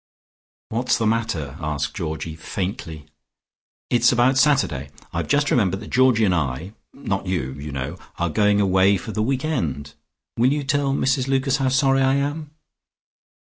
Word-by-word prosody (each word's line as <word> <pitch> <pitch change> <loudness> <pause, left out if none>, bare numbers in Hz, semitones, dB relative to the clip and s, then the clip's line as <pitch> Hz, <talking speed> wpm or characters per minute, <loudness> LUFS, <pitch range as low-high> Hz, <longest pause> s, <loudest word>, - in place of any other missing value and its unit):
"What's 120 +3 +1
the 115 - -1
matter?" 95 - -1
asked 75 -2 -3
Georgie 80 -3 -4
faintly. 80 -3 -5 0.9
"It's 120 0 +4
about 125 +2 +3
Saturday. 130 - +2 0.2
I've - - -2
just 145 0 +2
remembered 95 -5 +2
that 110 - -10
Georgie 125 -3 +4
and 95 - +2
I 80 +3 -2 0.2
not 100 -8 -4
you, 85 -8 -1
you 70 +2 -7
know 70 +6 -5 0.2
are 85 -3 -1
going 105 +2 +3
away 95 0 +4
for 100 - -7
the 110 - -2
weekend. 110 - -2 0.4
Will 125 +3 +3
you 145 0 -1
tell 140 0 0
Mrs 130 -1 +1
Lucas 135 0 +1
how 135 -2 +1
sorry 135 +1 +3
I 135 0 +3
am?" 145 +2 -2
110 Hz, 155 wpm, -22 LUFS, 80-130 Hz, 0.9 s, It's